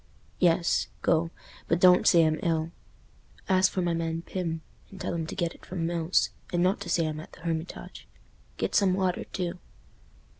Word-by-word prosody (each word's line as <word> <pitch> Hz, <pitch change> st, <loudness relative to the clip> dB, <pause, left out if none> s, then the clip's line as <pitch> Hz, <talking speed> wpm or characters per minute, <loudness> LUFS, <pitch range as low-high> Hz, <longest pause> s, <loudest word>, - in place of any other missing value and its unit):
"Yes—go. 170 Hz, -1 st, +2 dB, 0.4 s
But 165 Hz, -, +2 dB
don't 180 Hz, 0 st, +6 dB
say 170 Hz, -1 st, +7 dB
I'm 155 Hz, 0 st, +1 dB
ill. 165 Hz, -3 st, 0 dB, 0.8 s
Ask 190 Hz, 0 st, +4 dB
for 185 Hz, -, -1 dB
my 170 Hz, -1 st, +1 dB
man 165 Hz, 0 st, -2 dB
Pym, 165 Hz, -4 st, -3 dB, 0.3 s
and 195 Hz, -, -12 dB
tell -, -, -3 dB
him 165 Hz, -2 st, -2 dB
to -, -, -6 dB
get 170 Hz, -2 st, -1 dB
it -, -, -19 dB
from 175 Hz, -3 st, -3 dB
Mills, 170 Hz, +1 st, +1 dB, 0.2 s
and 175 Hz, 0 st, +1 dB
not 185 Hz, +2 st, +2 dB
to -, -, -5 dB
say 165 Hz, -, +2 dB
I'm 155 Hz, -1 st, -3 dB
at 155 Hz, -, -11 dB
the -, -, -14 dB
Hermitage. 165 Hz, 0 st, -5 dB, 0.5 s
Get -, -, -2 dB
some 190 Hz, -3 st, +4 dB
water 185 Hz, -2 st, 0 dB
too." 180 Hz, -1 st, -4 dB
170 Hz, 180 wpm, -28 LUFS, 165-180 Hz, 0.8 s, say